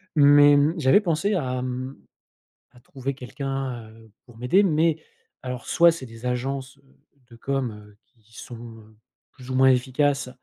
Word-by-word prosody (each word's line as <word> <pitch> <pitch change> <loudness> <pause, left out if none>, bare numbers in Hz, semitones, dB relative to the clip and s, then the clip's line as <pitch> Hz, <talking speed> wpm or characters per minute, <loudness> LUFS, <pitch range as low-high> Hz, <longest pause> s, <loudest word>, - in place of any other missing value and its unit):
mais, 145 0 +6
mmh, 145 +3 +2
j'avais 140 +8 +4
pensé 195 +3 0
à, 130 -7 -2
hem, 130 +1 -5 0.8
à 125 - -18
trouver 135 +2 -6
quelqu'un, 135 -2 -5
heu, 110 0 -18 0.2
pour 120 -2 -17
m'aider 125 +11 +3
mais 160 -3 +1 0.4
alors 125 -1 -6
soit 170 0 +5
c'est 165 -5 -7
des 115 +1 -8
agences, 130 +2 -4
heu, 140 - -28 0.5
de - - -13
com, 135 -1 -2
heu, 105 -1 -15
qui 115 -1 -23
sont, 120 - -9 0.3
heu, 110 0 -20 0.4
plus 130 0 -14
ou 130 - -3
moins 130 +1 +5
efficaces 135 +1 0
130 Hz, 165 wpm, -24 LUFS, 125-145 Hz, 0.8 s, mais